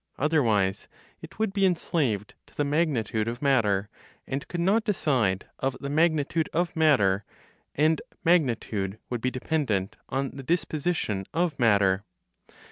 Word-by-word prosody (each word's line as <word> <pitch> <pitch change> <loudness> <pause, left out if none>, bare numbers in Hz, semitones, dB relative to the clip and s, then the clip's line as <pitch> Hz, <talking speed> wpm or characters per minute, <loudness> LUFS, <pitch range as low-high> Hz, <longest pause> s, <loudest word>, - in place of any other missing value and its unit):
Otherwise, 115 -11 +1 0.3
it - - -11
would 215 -2 0
be 200 -1 +1
enslaved 150 - 0
to - - -23
the 145 - +1
magnitude 140 -8 0
of 120 +1 -3
matter, 105 -8 +2 0.4
and 135 +1 -4
could 175 - -4
not 200 +6 +3
decide 130 - 0
of 135 -1 -1
the 140 0 -4
magnitude 160 0 +1
of 175 +1 0
matter, 105 -12 +3 0.5
and 155 +2 +2 0.2
magnitude 115 - +1
would 120 -2 -2
be 130 - +1
dependent 125 -8 -1
on 135 +1 -1
the 135 - -8
disposition 155 - -1
of 170 -1 +1
matter. 100 -4 +3
140 Hz, 135 wpm, -27 LUFS, 105-160 Hz, 0.5 s, not